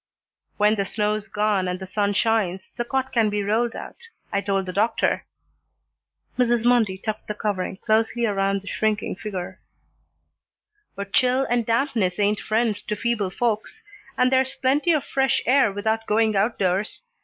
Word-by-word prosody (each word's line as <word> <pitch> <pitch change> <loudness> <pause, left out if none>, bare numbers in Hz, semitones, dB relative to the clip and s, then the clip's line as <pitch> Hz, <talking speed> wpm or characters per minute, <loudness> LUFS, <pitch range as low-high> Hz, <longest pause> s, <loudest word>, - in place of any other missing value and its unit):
"When 210 +1 +4
the 200 -2 -1
snow's 210 +1 -1
gone 210 -3 0
and 180 0 -3
the 190 - -6
sun 205 +2 0
shines, 200 -4 0
the 240 - -1
cot 265 +2 -2
can 225 -3 +3
be 205 0 -1
rolled 225 +3 0
out, 470 - -9 0.3
I 200 - +1
told 195 -1 -1
the 185 - -5
doctor," 215 +5 +1 1.1
Mrs. 240 -2 +2
Mundy 230 -6 +3
tucked 215 +2 -5
the 210 - -3
covering 200 -3 -2
closely 225 +3 +1
around 195 -2 0
the - - -15
shrinking 215 -2 -1
figure, 190 -2 -6 1.4
"but 200 0 -7
chill 255 +1 +3
and 240 -2 +1
dampness 230 -6 +1
ain't 205 0 +1
friends 220 -1 0
to 210 - -3
feeble 230 -4 -1
folks, 230 - -2 0.3
and 250 0 +3
there's 260 0 +2
plenty 285 +6 +2
of 305 -4 +1
fresh 270 0 +1
air 265 -3 +4
without 220 +3 -1
going 215 0 +2
outdoors. 195 - 0
215 Hz, 160 wpm, -23 LUFS, 200-235 Hz, 1.4 s, When